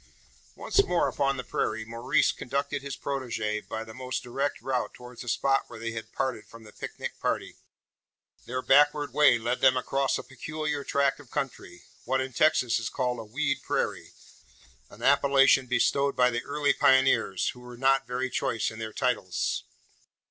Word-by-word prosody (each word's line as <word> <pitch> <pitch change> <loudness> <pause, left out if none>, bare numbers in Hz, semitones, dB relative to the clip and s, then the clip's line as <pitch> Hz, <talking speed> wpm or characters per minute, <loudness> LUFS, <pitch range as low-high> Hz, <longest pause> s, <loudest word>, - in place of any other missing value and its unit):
Once 400 - +2
more 175 - +1
upon 140 -1 0
the 125 - -4
prairie, 110 -1 -2
Maurice 115 +2 +1
conducted 140 +2 -3
his 140 0 -6
protegee 120 -6 -3
by 110 0 -4
the 110 0 -11
most 130 0 -4
direct 135 +4 -2
route 130 -2 -2
towards 125 -1 -11
the 125 - -9
spot 135 +3 +1
where 115 - -10
they 115 0 -4
had 110 0 -7
parted 130 -5 -2
from 115 0 -14
the 105 -1 -14
picnic - - -7
party. - - -2 0.9
Their 130 +1 -3
backward 145 -1 +4
way 145 -4 +6
led 120 +2 -2
them 130 -1 +5
across 135 +1 0
a - - -6
peculiar 150 +2 -4
tract 140 0 +1
of 140 -4 -15
country 135 -1 -5 0.2
what 130 +2 0
in 130 0 -3
Texas 125 -5 +3
is 115 - -3
called 125 -2 -2
a - - -5
"weed 140 +6 -1
prairie," - - -2 0.8
an - - -13
appellation 135 -1 +5
bestowed 140 +2 +2
by 125 0 +4
the 120 +1 -2
early 145 0 +1
pioneers, 130 -8 +3
who 125 - -8
were 125 0 -11
not 135 +1 +2
very 125 +1 -2
choice 115 - -1
in 110 - -10
their 110 -1 -5
titles. 110 -8 -1
130 Hz, 175 wpm, -28 LUFS, 120-140 Hz, 0.9 s, way